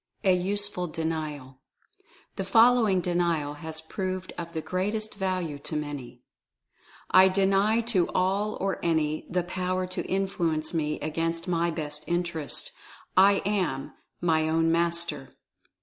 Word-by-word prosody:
A 185 Hz, -2 st, +5 dB
USEFUL 195 Hz, 0 st, -1 dB
DENIAL. 155 Hz, -5 st, -4 dB, 0.8 s
The -, -, -2 dB
following 225 Hz, -5 st, +5 dB
Denial 170 Hz, -4 st, 0 dB
has 160 Hz, -1 st, -4 dB
proved 185 Hz, +2 st, -4 dB
of 170 Hz, -1 st, -6 dB
the 160 Hz, -, -2 dB
greatest 210 Hz, +6 st, -2 dB
value 185 Hz, -7 st, -2 dB
to 155 Hz, -, -4 dB
many: 140 Hz, -5 st, -5 dB, 0.9 s
"I 185 Hz, 0 st, +8 dB
DENY, 195 Hz, +4 st, +3 dB
to 210 Hz, -7 st, +1 dB
all 195 Hz, +3 st, 0 dB
or 195 Hz, 0 st, -1 dB
any, 155 Hz, -2 st, 0 dB
the 180 Hz, 0 st, 0 dB
power 185 Hz, +1 st, -2 dB
to 185 Hz, -, -4 dB
Influence 170 Hz, -5 st, -1 dB
me 150 Hz, -2 st, -1 dB
against 165 Hz, +3 st, -2 dB
my 170 Hz, -1 st, +1 dB
best 150 Hz, -2 st, -4 dB
interests 175 Hz, -3 st, -2 dB, 0.2 s
— -, -, -18 dB
/ -, -, -36 dB
Am 190 Hz, -7 st, +2 dB, 0.3 s
my 160 Hz, -2 st, +2 dB
ozvn 165 Hz, +1 st, +2 dB
Master." 170 Hz, -4 st, +1 dB
175 Hz, 135 wpm, -27 LUFS, 160-190 Hz, 0.9 s, I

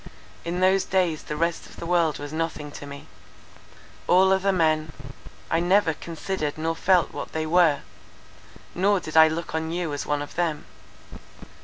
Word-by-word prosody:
In 175 Hz, +2 st, -3 dB
those 190 Hz, +1 st, +4 dB
days 180 Hz, -5 st, 0 dB
the 150 Hz, -, -6 dB
rest 170 Hz, +2 st, -1 dB
of -, -, -15 dB
the -, -, -7 dB
world 170 Hz, -3 st, +2 dB
was 145 Hz, +1 st, -7 dB
nothing 155 Hz, -2 st, -3 dB
to 145 Hz, -, -9 dB
me: 140 Hz, 0 st, -9 dB, 1.0 s
all 190 Hz, +1 st, +5 dB
other 190 Hz, +1 st, +2 dB
men—I 155 Hz, -2 st, -2 dB
never 175 Hz, 0 st, +3 dB
considered 160 Hz, -1 st, -4 dB
nor 165 Hz, +1 st, -1 dB
felt 180 Hz, +1 st, +2 dB
what -, -, -6 dB
they 160 Hz, 0 st, -2 dB
were; 160 Hz, -3 st, +3 dB, 0.9 s
nor 200 Hz, +2 st, +2 dB
did 155 Hz, -3 st, -8 dB
I 160 Hz, 0 st, +8 dB
look 160 Hz, +1 st, -4 dB
on 160 Hz, 0 st, -2 dB
you 170 Hz, -2 st, -2 dB
as 145 Hz, -, -4 dB
one 145 Hz, 0 st, 0 dB
of 145 Hz, -, -10 dB
them. 165 Hz, -3 st, -1 dB
165 Hz, 165 wpm, -25 LUFS, 155-180 Hz, 1.0 s, I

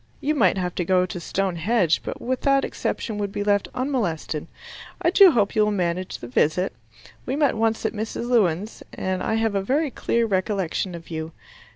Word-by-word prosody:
You 300 Hz, -, 0 dB
might 200 Hz, -, +3 dB
have 180 Hz, -1 st, -2 dB
to -, -, +1 dB
go 180 Hz, +1 st, +3 dB
to 180 Hz, 0 st, -6 dB
Stone 185 Hz, +1 st, -2 dB
Henge, 185 Hz, -1 st, +2 dB
but -, -, -5 dB
with 255 Hz, +1 st, -2 dB
that 275 Hz, -1 st, +3 dB
exception 215 Hz, -3 st, -3 dB
would 200 Hz, -1 st, -2 dB
be 205 Hz, -, -2 dB
left 205 Hz, -1 st, +2 dB
unmolested. 200 Hz, -, -2 dB, 0.5 s
I 345 Hz, -2 st, +2 dB
do 395 Hz, 0 st, +8 dB
hope 215 Hz, -, +1 dB
you 215 Hz, -, +4 dB
will 210 Hz, -, +1 dB
manage 180 Hz, -2 st, -2 dB
the 120 Hz, -, -9 dB
visit. 155 Hz, +9 st, +1 dB, 0.5 s
We 260 Hz, -, -1 dB
met 290 Hz, -1 st, +2 dB
once 225 Hz, 0 st, 0 dB
at -, -, 0 dB
Mrs. 220 Hz, +2 st, -4 dB
Lewin's, 210 Hz, -4 st, +1 dB
and 185 Hz, -1 st, -2 dB
I 220 Hz, -, 0 dB
have 225 Hz, -1 st, +1 dB
a 195 Hz, -, +1 dB
very 280 Hz, +8 st, 0 dB
clear 235 Hz, 0 st, 0 dB
recollection 190 Hz, -3 st, -1 dB
of 170 Hz, 0 st, -11 dB
you. 160 Hz, 0 st, -5 dB
205 Hz, 200 wpm, -24 LUFS, 180-235 Hz, 0.5 s, do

